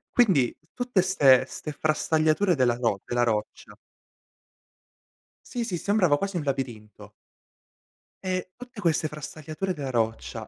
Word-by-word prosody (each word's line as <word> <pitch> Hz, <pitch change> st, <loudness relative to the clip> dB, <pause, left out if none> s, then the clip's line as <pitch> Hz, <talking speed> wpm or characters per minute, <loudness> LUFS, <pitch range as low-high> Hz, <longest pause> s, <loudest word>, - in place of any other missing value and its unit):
Quindi, 180 Hz, -, +4 dB, 0.2 s
tutte 245 Hz, -6 st, +1 dB
'ste 140 Hz, -9 st, +5 dB
'ste 150 Hz, -, -7 dB
frastagliature, 155 Hz, +4 st, +2 dB
della 125 Hz, -4 st, +2 dB
ro 115 Hz, -5 st, 0 dB
della 120 Hz, 0 st, 0 dB
roccia. 110 Hz, -3 st, -2 dB, 1.8 s
Sì, 240 Hz, -1 st, -1 dB
sì, 185 Hz, -6 st, -3 dB
sembrava 180 Hz, -5 st, +2 dB
quasi 195 Hz, +1 st, -3 dB
un 155 Hz, -, -2 dB
labirinto. 115 Hz, -7 st, -5 dB, 1.1 s
E 185 Hz, -1 st, -2 dB
tutte 250 Hz, -2 st, -11 dB
queste 160 Hz, -3 st, +1 dB
frastagliature 155 Hz, +4 st, -5 dB
della 145 Hz, -5 st, -5 dB
roccia, 115 Hz, -3 st, -2 dB
155 Hz, 120 wpm, -26 LUFS, 125-185 Hz, 1.8 s, ste